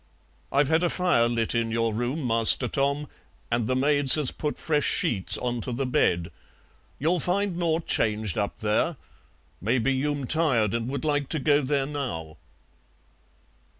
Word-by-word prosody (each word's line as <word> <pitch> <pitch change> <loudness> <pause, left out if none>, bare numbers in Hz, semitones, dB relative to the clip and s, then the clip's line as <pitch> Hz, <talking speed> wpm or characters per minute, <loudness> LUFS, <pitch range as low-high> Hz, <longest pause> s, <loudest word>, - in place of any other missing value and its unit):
I've 140 +1 +2
had 160 +1 +2
a 175 - +1
fire 175 -12 +1
lit 115 -1 -1
in 115 -1 0
your 115 0 -1
room, 125 +6 -3
Master 115 +2 +4
Tom, 140 +3 -1 0.4
and 120 -2 0
the 130 - 0
maids 140 0 +5
has 150 -4 +1
put 150 -1 -4
fresh 150 -2 0
sheets 95 -5 +1
on 120 -1 -3
to 125 - -5
the 130 +3 -2
bed. 85 -9 0 0.7
You'll 170 +5 0
find 190 +3 -1
nought 170 -1 -1
changed 105 -3 0
up 105 -1 -3
there. 110 +9 0 0.6
Maybe 120 +6 +1
you'm 140 +1 -2
tired 125 -9 +1
and 115 +1 -2
would 140 +3 -4
like 145 -2 -1
to 160 - -2
go 145 +1 +2
there 140 0 0
now." 125 - -5
135 Hz, 160 wpm, -25 LUFS, 115-150 Hz, 0.7 s, maids